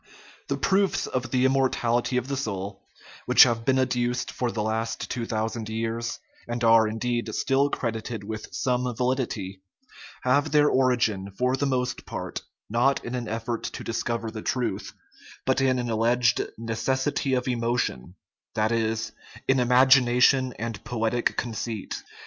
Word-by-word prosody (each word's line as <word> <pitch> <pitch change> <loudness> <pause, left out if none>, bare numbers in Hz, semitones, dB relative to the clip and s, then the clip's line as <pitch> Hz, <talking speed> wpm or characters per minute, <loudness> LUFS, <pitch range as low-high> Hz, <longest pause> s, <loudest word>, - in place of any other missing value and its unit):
The - - -1
proofs 195 0 +2
of 130 -1 -3
the 130 0 +2
immortality 125 -2 +1
of 125 - -1
the 140 - -2
soul, 100 -6 -4 0.5
which - - +9
have 115 -2 +1
been 130 -1 +3
adduced 125 -1 0
for 125 - -2
the 110 -2 -2
last 110 +2 -2
two 115 -2 -3
thousand 110 0 -2
years, 115 +1 -2 0.3
and 120 0 -3
are, 115 -1 +6
indeed, 120 +2 -2
still 140 +1 +2
credited 115 -3 -3
with 110 +1 -6
some 125 -1 0
validity, 115 -7 -2 0.6
have 135 +3 +2
their 150 0 +5
or 130 -1 +3
igin, 110 -6 0
for 125 +1 +2
the 140 +1 0
most 125 -2 -2
part, - - -5 0.3
not 120 +5 +1
in 120 - -5
an 120 -2 -3
effort 115 +1 -3
to - - -5
discover 115 0 -2
the 110 - -6
truth, 125 +1 -2 0.5
but 130 +1 +2
in 130 -1 +3
an 120 -1 -2
alleged 115 +1 +2
"necessity 130 +5 -1
of 125 0 -1
emotion 115 - -1 0.2
" - - -52
that 110 +1 +1
is, 115 -1 0 0.4
in 135 -1 +3
imagination 125 0 +5
and 115 -1 -5
poetic 120 0 -1
conceit. 115 -2 -3
120 Hz, 155 wpm, -26 LUFS, 115-130 Hz, 0.6 s, which